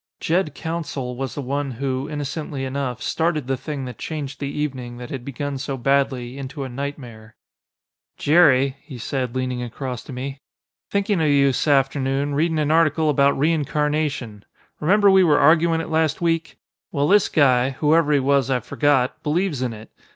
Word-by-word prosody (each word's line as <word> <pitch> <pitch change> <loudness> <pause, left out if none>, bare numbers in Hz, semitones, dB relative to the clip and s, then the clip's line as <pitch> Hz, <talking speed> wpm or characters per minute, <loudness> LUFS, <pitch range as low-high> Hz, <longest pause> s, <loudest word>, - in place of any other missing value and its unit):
Jed 165 -3 0
Counsell 150 -6 -4
was 135 0 -4
the 145 - -4
one 140 +2 -2
who, 130 +3 -3
innocently 145 -1 -4
enough, 130 -2 -3
started 160 -4 0
the 135 +1 -1
thing 140 0 -5
that 125 - -8
changed 145 -3 -5
the 140 - -3
evening, 130 -5 -4
that 125 0 -8
had 130 -3 -5
begun 140 +1 -4
so 135 0 -4
badly, 135 -1 0
into 140 +1 -6
a 130 - -5
nightmare. 120 -5 -7 0.8
"Jerry," 140 -4 +4
he 135 -6 -10
said, 125 +1 -3
leaning 130 -1 -2
across 125 0 -5
to 150 - -9
me, 135 +2 -5 0.5
"thinkin' 200 -2 0
of 155 - +2
you 140 -1 +4
s'afternoon. 135 0 +1
Readin' 160 +3 +1
an 150 -1 +1
article 160 -1 +3
about 140 0 +3
reincarnation. 150 -6 -1 0.4
Remember 200 +5 +4
we 190 -1 +6
were 155 -4 +4
arguin' 165 +2 +4
it 165 - -7
last 160 -2 +1
week? 165 -3 -1 0.3
Well, 145 +1 +1
this 205 +4 +4
guy, 130 -4 +3
whoever 150 +3 +2
he 145 - +4
was 135 -1 +2
I've 125 -3 0
forgot, 140 -4 +1
believes 155 -2 -1
in 125 -2 -1
it. 110 -1 -11
140 Hz, 170 wpm, -22 LUFS, 130-155 Hz, 0.8 s, we